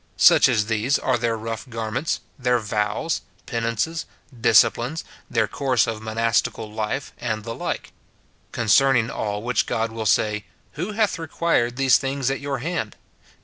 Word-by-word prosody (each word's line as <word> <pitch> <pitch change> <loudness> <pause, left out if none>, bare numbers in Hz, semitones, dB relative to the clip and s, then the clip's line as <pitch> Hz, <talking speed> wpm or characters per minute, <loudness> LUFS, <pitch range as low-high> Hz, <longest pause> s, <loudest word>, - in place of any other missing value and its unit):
Such - - +7
as 105 - +2
these 110 +5 +1
are 130 - +1
their 115 -1 0
rough 115 +2 -5
garments, 115 +6 -2 0.2
their 125 -1 +2
vows, 105 +7 -1 0.2
penances, 115 +8 -2 0.4
disciplines, 120 +7 +4 0.3
their 110 -3 +1
coui'se 130 -3 +1
of 110 -2 -4
monastical 110 -1 0
life, 110 +5 -3
and 110 -3 -2
the 115 +1 -5
like; - - -4 0.6
concerning 120 +1 +3
all 105 0 -3
which 125 +1 +1
God 115 0 -1
will 110 -1 -3
say, 105 +1 +1
" - - -37
Who 180 +8 -4
hath 210 -4 +1
required 160 -7 0
these 135 0 +4
things 135 -1 -1
at 135 - -2
your 140 -1 -3
hand?" 140 -5 -3
115 Hz, 150 wpm, -23 LUFS, 110-135 Hz, 0.6 s, Such